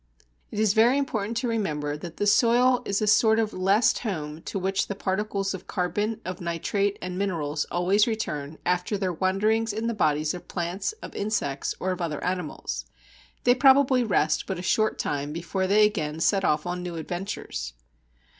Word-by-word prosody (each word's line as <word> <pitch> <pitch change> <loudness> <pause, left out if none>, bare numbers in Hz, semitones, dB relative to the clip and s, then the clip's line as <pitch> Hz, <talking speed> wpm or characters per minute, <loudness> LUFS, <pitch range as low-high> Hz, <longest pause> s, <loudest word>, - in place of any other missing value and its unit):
It - - -8
is 215 -2 +3
very 235 +5 +5
important 230 -5 -2
to 250 +1 -1
remember 150 -11 -1
that 165 +2 -8
the 205 - 0
soil 240 +4 +4
is 200 +1 0
a - - +2
sort 220 +1 +4
of 220 -1 0
last 195 +5 +3
home 155 -8 -4
to - - -3
which 190 +1 0
the 200 - -4
particles 195 0 -1
of 190 0 -8
carbon, 205 +4 -1
of 185 -1 -5
nitrate, 195 +4 -1
and 180 0 -4
minerals 160 -6 -1
always 195 +6 +2
return 155 -10 -3
after 180 +3 0
their 190 -2 -1
wanderings 210 +6 +1
in 220 +2 -3
the 235 - 0
bodies 155 -6 +1
of 180 - -9
plants, 175 - -3
of - - -8
insects, 195 -10 -2
or 185 - -1
of 180 - -4
other 160 -3 -3
animals. 180 -3 -3 0.6
They 245 - +6
probably 265 -1 +5
rest 155 -8 +1
but 190 - -3
a 175 - -6
short 215 +3 +1
time 145 0 -2
before 175 +3 -2
they 210 +2 +5
again 160 -7 -2
set 195 +3 +2
off 150 -2 +1
on 175 0 -3
new 175 -1 -5
adventures. 165 - -5
195 Hz, 185 wpm, -26 LUFS, 170-215 Hz, 0.6 s, They